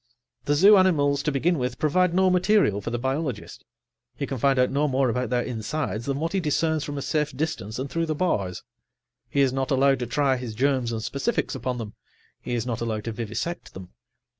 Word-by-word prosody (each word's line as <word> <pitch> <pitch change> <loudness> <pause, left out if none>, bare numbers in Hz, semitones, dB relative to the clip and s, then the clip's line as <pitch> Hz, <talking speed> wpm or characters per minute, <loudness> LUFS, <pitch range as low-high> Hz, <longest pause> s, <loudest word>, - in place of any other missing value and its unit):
The 145 - +2
zoo 200 +7 +7
animals, 145 -7 +3
to 150 - -1
begin 160 +4 +1
with, 125 -1 -2
provide 180 +4 +2
no 185 +1 +3
material 180 - +3
for 100 - -4
the 120 - -2
biologist; 130 -2 -3 0.5
he - - -3
can 135 - -5
find 135 +2 +3
out 125 0 +3
no 145 +2 +1
more 135 -1 +1
about 125 -1 -2
their 120 0 +1
insides 115 0 -3
than 140 0 -1
what 165 +2 -2
he 195 - +2
discerns 160 -1 0
from 145 -1 -5
a 140 - -3
safe 150 -3 -1
distance 135 -9 -3
and 130 +2 -3
through 165 +3 -2
the 155 - -1
bars. 100 - -1 0.7
He 140 - +1
is 130 -2 +3
not 135 -1 -1
allowed 135 -1 +3
to 125 - -3
try 135 0 +1
his 120 -3 -6
germs 130 -1 +1
and 110 -1 -3
specifics 140 - -1
upon 125 -1 -3
them; 110 -3 -6 0.5
he 120 - -3
is 115 -1 -2
not 120 -2 -3
allowed 110 -2 -2
to 115 - -3
vivisect 115 +10 -5
them. 95 -1 -9
135 Hz, 215 wpm, -25 LUFS, 120-155 Hz, 0.7 s, zoo